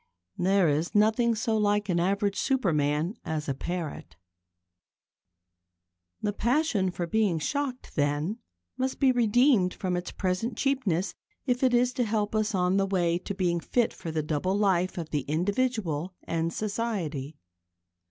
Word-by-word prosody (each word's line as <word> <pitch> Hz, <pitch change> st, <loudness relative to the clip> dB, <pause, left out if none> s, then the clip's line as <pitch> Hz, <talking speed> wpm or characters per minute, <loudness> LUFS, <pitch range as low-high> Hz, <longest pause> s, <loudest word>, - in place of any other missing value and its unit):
There 190 Hz, 0 st, +3 dB
is 155 Hz, +5 st, 0 dB
nothing 220 Hz, +3 st, +3 dB
so 220 Hz, +1 st, 0 dB
like 205 Hz, -1 st, +1 dB
an 175 Hz, -3 st, +1 dB
average 200 Hz, +3 st, +1 dB
superman 170 Hz, -, +1 dB
as 155 Hz, -1 st, -3 dB
a 140 Hz, -, 0 dB
parrot. 155 Hz, -, -5 dB, 2.1 s
The 205 Hz, -, 0 dB
passion 235 Hz, -, +1 dB
for 175 Hz, -1 st, -3 dB
being 205 Hz, -1 st, +1 dB
shocked, 265 Hz, -, -3 dB
then, 150 Hz, +8 st, 0 dB, 0.4 s
must 260 Hz, 0 st, -2 dB
be 270 Hz, -2 st, +5 dB
redeemed 240 Hz, -4 st, +3 dB
from 185 Hz, -2 st, -2 dB
its 175 Hz, 0 st, -4 dB
present 195 Hz, +5 st, -2 dB
cheapness 220 Hz, -, 0 dB, 0.3 s
if 250 Hz, -2 st, 0 dB
it 255 Hz, -2 st, +4 dB
is 250 Hz, +1 st, +3 dB
to 245 Hz, -, 0 dB
help 210 Hz, -2 st, -1 dB
us 215 Hz, -1 st, 0 dB
on 180 Hz, +1 st, +2 dB
the 195 Hz, 0 st, +2 dB
way 175 Hz, -3 st, +1 dB
to 200 Hz, -, -5 dB
being 175 Hz, -3 st, +1 dB
fit 240 Hz, +7 st, 0 dB
for 175 Hz, -, -7 dB
the 160 Hz, -1 st, -1 dB
double 160 Hz, +6 st, 0 dB
life 185 Hz, -3 st, +1 dB
of 165 Hz, -3 st, -5 dB
the 150 Hz, -, 0 dB
individual 180 Hz, -, -1 dB
and 165 Hz, 0 st, -1 dB
society. 175 Hz, -, -3 dB
195 Hz, 150 wpm, -28 LUFS, 170-225 Hz, 2.1 s, be